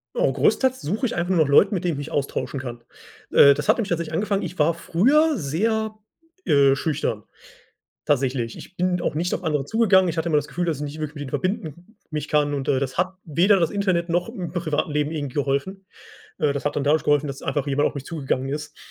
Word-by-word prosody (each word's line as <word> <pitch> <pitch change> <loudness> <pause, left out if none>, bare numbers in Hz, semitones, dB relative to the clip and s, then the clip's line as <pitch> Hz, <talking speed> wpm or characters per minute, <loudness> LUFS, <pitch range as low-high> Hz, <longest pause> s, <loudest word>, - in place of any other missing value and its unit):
Oh, - - +2
großteils 260 -1 +2
suche 210 - -2
ich - - -2
einfach 175 +2 0
nach 155 -4 +3
Leuten, 195 +8 +5
mit 180 - -3
denen 175 -2 0
ich - - -5
mich - - -10
austauschen 135 -1 -2
kann. 120 -2 -7 0.5
Äh, 140 - +8
das 150 +1 -4
hat - - +5
nämlich 210 -4 -2
tatsächlich 170 -2 -2
angefangen 200 +2 0
ich 180 - -6
war 160 +2 +3
früher 275 - +2
sehr, 220 +8 -1 0.5
äh, 140 -1 +4
schüchtern, 135 -8 -2 0.8
tatsächlich. 130 -4 0
Ich 185 - -12
bin 180 0 0
auch 150 - -2
nicht 175 +2 0
auf - - -4
andere 150 -5 0
zugegangen. 190 -1 +3
Ich 165 - -3
hatte 160 +1 -1
immer 155 - +2
das 145 - 0
Gefühl, 175 +3 -3
dass 165 -3 -1
ich 150 - -5
nicht 150 +2 -7
wirklich 150 0 -4
mit 145 - -5
ihnen 130 - -7
verbinden 175 - -4
mich 155 -1 -4
kann 145 -1 +1
und, 135 -2 -4
äh, 135 - +3
das 130 -1 -3
hat 185 +2 0
weder 180 +6 +3
das 165 -3 +1
Internet 185 -4 0
noch 175 +3 0
im 185 -8 -6
privaten 160 -3 -1
Leben 150 0 0
irgendwie 145 -5 -4
geholfen. 145 +8 -2 0.6
Äh, 150 -4 +2
das 140 - -5
hat 145 - -1
dann 145 - 0
dadurch 150 +2 +2
geholfen, 145 0 +2
dass 135 -1 -7
einfach 145 -1 -2
jemand 140 +1 +2
auf - - -7
mich 140 - -6
zugegangen 135 -4 -2
ist 150 +1 -5
155 Hz, 230 wpm, -23 LUFS, 145-185 Hz, 0.8 s, Äh